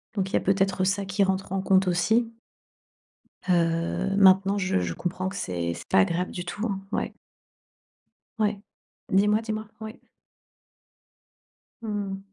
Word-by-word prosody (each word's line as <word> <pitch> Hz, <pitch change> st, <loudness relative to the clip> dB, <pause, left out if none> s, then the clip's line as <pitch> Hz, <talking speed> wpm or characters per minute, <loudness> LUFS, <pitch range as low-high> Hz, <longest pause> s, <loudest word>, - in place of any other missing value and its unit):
Donc 195 Hz, -2 st, -1 dB
il -, -, -13 dB
y -, -, +4 dB
a -, -, -1 dB
peut-être 195 Hz, -1 st, +1 dB
ça 195 Hz, +1 st, 0 dB
qui 195 Hz, +1 st, +1 dB
rentre 190 Hz, -1 st, -1 dB
en 195 Hz, -, 0 dB
compte 190 Hz, 0 st, +3 dB
aussi 220 Hz, +7 st, +2 dB, 1.2 s
heu, 170 Hz, +2 st, +1 dB
maintenant 195 Hz, 0 st, +5 dB
je 190 Hz, -, +1 dB
je 85 Hz, -2 st, -2 dB
comprends 185 Hz, -, -3 dB
que 195 Hz, -, -9 dB
c'est 85 Hz, -, -2 dB
c'est -, -, -10 dB
pas -, -, +4 dB
agréable 170 Hz, -, +1 dB
du 180 Hz, -, -5 dB
tout 190 Hz, +5 st, -4 dB
hein, 195 Hz, -3 st, -3 dB
ouais. -, -, -2 dB, 1.2 s
Ouais, 210 Hz, -2 st, 0 dB, 0.5 s
dis-moi, 210 Hz, +3 st, +3 dB
dis-moi, 215 Hz, -1 st, -4 dB
ouais. 220 Hz, +3 st, -8 dB, 1.8 s
Mmh. 205 Hz, -3 st, -3 dB
195 Hz, 145 wpm, -26 LUFS, 180-205 Hz, 1.8 s, maintenant